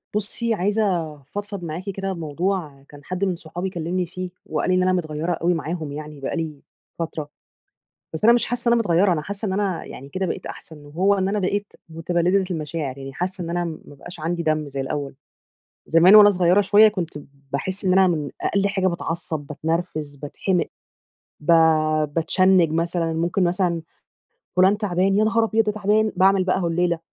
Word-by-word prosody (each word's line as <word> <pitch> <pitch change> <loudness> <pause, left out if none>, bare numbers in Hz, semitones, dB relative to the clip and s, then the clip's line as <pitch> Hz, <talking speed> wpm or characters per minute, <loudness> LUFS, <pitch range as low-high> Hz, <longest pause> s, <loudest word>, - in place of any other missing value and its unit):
بُصي 225 +3 -1
عايزة 190 -5 0
افضفض 200 +7 -7
معاكِ 165 +2 -5
كده 195 0 -3
بموضوع، 165 -2 -3
كان 145 -1 -14
حد 185 +4 -2
من 185 - 0
صحابي 175 +3 -5
كلمني 180 +1 -2
فيه، 185 +1 -6 0.2
وقال - - -2
لي 185 - +3
إن 185 - +3
أنا 185 0 +2
متغيرة 160 -1 -2
أوي 170 +1 +1
معاهم 160 -2 -4
يعني 150 0 -8
بقى 135 - -3
لي 155 -4 -4 0.4
فترة. 160 -3 -4 0.8
بس 160 - -5
أنا 235 +2 +7
مش 240 - +2
حاسة 245 0 -3
إن - - +5
أنا 235 - +3
متغيرة، 185 -1 +3
أنا 155 - -2
حاسة 200 +6 -5
إن 190 - -1
أنا 195 -3 -1
يعني 135 +2 -10
كده 190 +6 -2
بقيت - - -4
أحسن، 150 -2 -10
وهو 180 +7 +2
إن 190 -1 0
أنا 205 +2 0
بقيت 205 +2 -2 0.2
مُتبلدة 175 +4 +1
المشاعر، 155 -4 -4
يعني 135 0 -8
حاسة 180 +4 -3
إن 165 - -5
أنا 175 +1 -1
ما 155 -3 -8
بقاش 175 +5 -11
عندي 170 +2 -2
دم 155 -2 0
زي 135 0 -4
الأول، 140 0 -4 0.7
زمان 175 +5 +6
وأنا 205 -1 +9
صغيرة 180 +2 +3
شوية 210 +2 +6
كنت 180 -7 -3 0.3
باحس 185 +8 -3
إن 185 - +3
أنا 190 0 +5
من 155 -5 -1
أقل 200 0 +1
حاجة 195 -2 0
باتعصب، 170 -2 -3
باتنرفز، 155 -1 -3
باتحمق، 160 +5 -1 0.7
ب 150 - -15 0.7
باتشنج 175 +1 +3
مثلًا، 165 0 0
ممكن 170 +3 0
مثلًا 175 -1 0 0.7
فلان 190 +3 +5
تعبان، 195 -1 +1
يا 215 - +4
نهار 230 +1 +2
أبيض، 225 0 +2
ده 210 - 0
تعبان! 215 +1 +1
باعمل 190 0 +4
بقى 185 +1 +1
هوليلة، 170 0 0
175 Hz, 185 wpm, -22 LUFS, 160-195 Hz, 0.8 s, وأنا